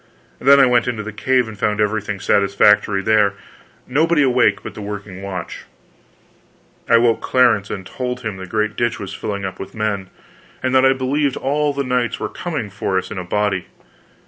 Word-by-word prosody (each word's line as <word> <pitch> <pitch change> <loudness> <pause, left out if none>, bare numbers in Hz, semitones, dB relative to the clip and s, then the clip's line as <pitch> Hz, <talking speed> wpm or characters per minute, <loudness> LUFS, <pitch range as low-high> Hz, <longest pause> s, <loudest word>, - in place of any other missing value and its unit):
Then 140 +1 +6
I 135 - +7
went 125 -1 +2
into 115 -3 -2
the 110 0 -7
cave, 130 +2 +1
and 110 - -8
found 105 0 0
everything 105 -1 -1
satisfactory 100 +1 +3
there 105 -2 +3 0.5
nobody 150 +3 +2
awake 125 -2 +2
but - - -7
the - - -9
working 100 -2 -7
watch. 100 -2 -6 1.2
I 115 - +7
woke 115 -1 +2
Clarence 115 -6 +2
and 95 -2 -5
told 125 +3 -4
him 110 -4 -4
the 95 0 -8
great 110 +2 -1
ditch 120 +1 -1
was 95 -1 -6
filling 100 -2 -4
up 95 -1 -6
with 95 0 -8
men, 105 -3 -2 0.5
and 130 0 0
that 130 0 +5
I 135 - +4
believed 135 +1 -1
all 145 +2 0
the 140 0 -2
knights 125 -2 -1
were - - -3
coming 150 - -5
for 95 -1 -2
us 95 - -3
in 105 - -4
a - - -4
body. 100 0 -1
110 Hz, 190 wpm, -19 LUFS, 100-130 Hz, 1.2 s, I